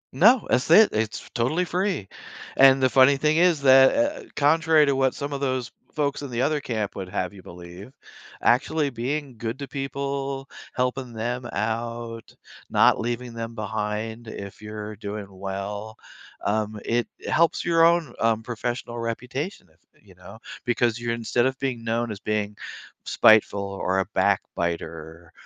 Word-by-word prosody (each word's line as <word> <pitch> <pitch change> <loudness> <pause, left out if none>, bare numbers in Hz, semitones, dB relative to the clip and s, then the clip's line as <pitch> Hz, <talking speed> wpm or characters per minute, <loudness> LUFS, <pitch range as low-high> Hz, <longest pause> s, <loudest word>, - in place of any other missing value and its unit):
No, 220 - +5
that's 125 - +1
it, 210 +6 +8
it's 110 0 -2
totally 140 +9 0
free, 180 - -1 0.5
and 135 0 +6
the 130 - +6
funny 135 +2 +5
thing 155 +2 +2
is 170 -4 +4
that, 130 0 +7 0.3
u - - -15
uh, - - -24
contrary 160 +1 +4
to 140 -1 +1
what 135 -1 +1
some 140 0 -4
of 140 - -4
those 130 -3 -1 0.2
folks 145 -2 -1
in 140 - -6
the 120 0 -2
other 150 0 +1
camp 110 -5 -3
would 95 -1 -5
have 90 +1 -3
you 100 - -12
believe 90 +6 -11 0.5
actually 140 +4 +2
being 130 +1 -4
good 115 +2 -4
to 140 -1 -6
people, 140 0 -4 0.3
helping 125 -1 -2
them 120 +2 -3
out, 115 +1 -4 0.3
not - - +4
leaving 120 +1 -3
them 115 0 -6
behind 110 +2 -4
if 100 -1 -8
you're 105 0 -7
doing 105 0 -6
well, 100 +3 -6 0.5
um, 105 +1 -1
it 120 +1 0 0.2
helps 165 0 +2
your 165 -1 +4
own, 165 -6 +3
um, 115 -1 +1
professional 120 0 -4
reputation 125 - -4
if 80 - -33 0.3
you 95 - -17
know, 90 +4 -13 0.3
because 120 -1 +1
you're 120 0 -2
instead 120 +1 0
of 130 0 -3
being 130 -4 -3
known 115 0 -1
as 100 - -6
being 105 -1 -2 0.5
spiteful 110 -2 +4
or 95 -1 -1
a 95 - +1
backbiter 80 -1 -2
120 Hz, 160 wpm, -24 LUFS, 105-135 Hz, 0.5 s, it